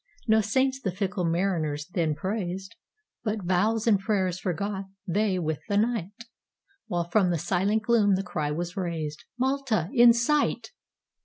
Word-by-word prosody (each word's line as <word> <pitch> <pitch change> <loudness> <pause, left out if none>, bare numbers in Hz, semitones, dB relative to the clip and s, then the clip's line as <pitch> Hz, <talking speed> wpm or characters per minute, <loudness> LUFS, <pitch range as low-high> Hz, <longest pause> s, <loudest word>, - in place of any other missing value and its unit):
No 220 0 +5
saints 260 +5 +1
the 195 - -1
fickle 190 0 -2
mariners 165 -4 0
then 160 -3 +1
praised, 190 +2 -4 0.5
But 215 -3 -2
vows 210 +5 +1
and 215 -4 +4
prayers 190 -3 0
forgot 195 +2 -3 0.2
they 195 +1 +1
with 160 -4 -2
the 200 - +2
night; 220 -1 -1 0.6
While 175 -1 -1
from 185 +1 +3
the 175 - +1
silent 200 +7 0
gloom 220 -4 +4
the 190 - -2
cry 155 -5 -2
was 170 +4 -3
raised,—"Malta 195 - -2
in 240 -1 +7
sight!" 285 - +1
195 Hz, 145 wpm, -27 LUFS, 175-220 Hz, 0.6 s, in